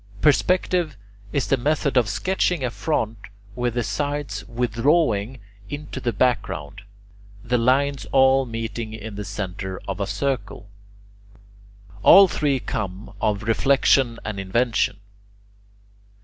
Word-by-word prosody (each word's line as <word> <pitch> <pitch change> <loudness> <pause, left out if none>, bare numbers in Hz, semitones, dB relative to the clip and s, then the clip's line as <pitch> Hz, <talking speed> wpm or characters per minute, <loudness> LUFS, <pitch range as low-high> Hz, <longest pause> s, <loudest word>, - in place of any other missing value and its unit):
Perspective 165 - +2 0.3
is 140 - 0
the 135 - +2
method 140 +2 0
of 120 -5 +3
sketching 180 - 0
a 125 - -1
front 115 -7 -2 0.4
with 120 -1 -1
the 120 - 0
sides 145 -7 -3
withdrawing 120 0 +1 0.3
into 145 -2 -6
the 125 -2 -1
background, 115 - -1 0.6
the 125 0 +1
lines 135 +3 +1
all 135 0 +4
meeting 115 -1 -5
in 110 0 -7
the 105 +1 -5
centre 95 -2 -5
of 100 -1 -4
a 100 - -1
circle. 105 -1 -3 1.3
All 195 - +9
three 145 -4 0
come 105 -5 -5
of 105 -1 0
reflexion 125 +1 +3
and 105 -2 -4
invention. 110 +2 0
120 Hz, 120 wpm, -23 LUFS, 105-140 Hz, 1.3 s, All